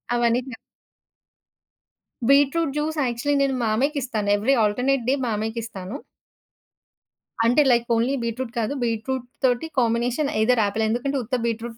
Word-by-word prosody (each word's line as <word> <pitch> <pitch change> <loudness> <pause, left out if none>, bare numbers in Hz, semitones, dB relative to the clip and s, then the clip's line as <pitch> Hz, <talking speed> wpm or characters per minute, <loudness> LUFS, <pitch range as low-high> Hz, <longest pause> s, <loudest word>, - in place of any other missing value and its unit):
అవన్నీటినా 240 +2 0 1.7
beetroot 280 +2 +3
juice 310 +1 -2
actually 255 +3 0
నేను 270 -1 +1
మామయ్యకిస్తాను. 235 -2 -1
Every 225 +7 +2
alternate 250 +5 +1
day - - +4
మామయ్యకిస్తాను. 220 -1 -4 1.5
అంటే 245 +6 +4
like 235 -1 +3
only 235 +4 +1
beetroot 235 +1 -3
కాదు. 225 +5 -1
బీట్రూట్ 240 +2 -2 0.2
తోటి 250 +4 +2
కాంబినేషన్ 240 +4 0
ఐదర్ 235 0 +3
ఆపిల్ 220 +2 -1
ఎందుకంటే 275 +5 -1
ఉత్త 255 +4 -2
బీట్రూట్ 230 0 -3
240 Hz, 115 wpm, -23 LUFS, 225-270 Hz, 1.7 s, day